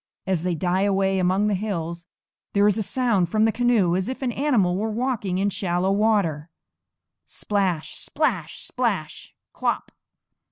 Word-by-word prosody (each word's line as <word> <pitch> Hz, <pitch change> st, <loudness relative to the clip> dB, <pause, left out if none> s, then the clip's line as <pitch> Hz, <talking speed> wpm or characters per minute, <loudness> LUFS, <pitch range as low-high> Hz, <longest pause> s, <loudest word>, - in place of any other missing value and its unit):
As 185 Hz, -4 st, 0 dB
they 180 Hz, 0 st, -1 dB
die 180 Hz, +3 st, 0 dB
away 195 Hz, -1 st, +2 dB
among 185 Hz, +3 st, +2 dB
the 210 Hz, -, +1 dB
hills 175 Hz, -4 st, -3 dB, 0.5 s
there 200 Hz, 0 st, +4 dB
is 210 Hz, +1 st, +3 dB
a -, -, +1 dB
sound 210 Hz, -4 st, +1 dB
from 215 Hz, +3 st, +2 dB
the 225 Hz, -, +3 dB
canoe 225 Hz, -7 st, +2 dB
as 190 Hz, +5 st, -1 dB
if 260 Hz, +1 st, -5 dB
an 250 Hz, -, 0 dB
animal 235 Hz, -10 st, +1 dB
were 215 Hz, +4 st, -1 dB
walking 220 Hz, -5 st, -1 dB
in 200 Hz, +1 st, +1 dB
shallow 180 Hz, 0 st, 0 dB
water, 195 Hz, -7 st, +1 dB, 0.8 s
_splash, 190 Hz, -6 st, -2 dB
splash, 210 Hz, -, -2 dB
splash, 210 Hz, -11 st, -3 dB, 0.2 s
klop! -, -, -2 dB
195 Hz, 155 wpm, -24 LUFS, 180-220 Hz, 0.8 s, there